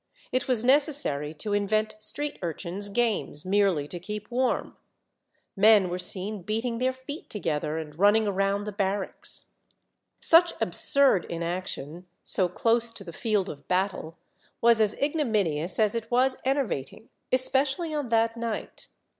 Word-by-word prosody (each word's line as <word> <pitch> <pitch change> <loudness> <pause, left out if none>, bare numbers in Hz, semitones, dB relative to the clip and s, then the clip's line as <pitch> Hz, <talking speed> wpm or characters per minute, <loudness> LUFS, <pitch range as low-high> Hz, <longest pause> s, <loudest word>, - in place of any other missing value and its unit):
It 255 0 -1
was 245 -4 +1
necessary 265 - +2
to 205 +7 -4
invent 215 +1 0
street 290 +7 0
urchins' 180 +4 -4
games, 210 -8 -2
merely 190 -6 +1
to 175 - -6
keep 210 +5 -8
warm; 255 +1 -1 0.8
men 200 -2 +5
were 180 - -3
seen 190 +3 -1
beating 225 +5 -3
their 255 +1 +1
feet 260 +4 -10
together, 160 -6 -3
and 155 -2 -7
running 210 +2 +4
around 195 +1 0
the 210 - -5
bar 200 0 -1
racks. - - -7 0.7
Such 340 +1 +5
absurd 275 - +6
inaction, 170 -1 -5 0.2
so 185 -2 +4
close 230 +3 +1
to 205 - -8
the 170 -3 -10
field 210 0 -1
of 145 -4 -10
battle, 180 -3 -2 0.4
was 235 -1 +4
as 215 -1 +2
ignominious 210 - -1
as 215 -2 +2
it 230 -1 -4
was 255 +2 +2
enervating, 235 - -3 0.2
especially 270 +5 +1
on 290 -5 -3
that 230 0 +1
night. 230 -2 -6
210 Hz, 145 wpm, -26 LUFS, 185-245 Hz, 0.8 s, absurd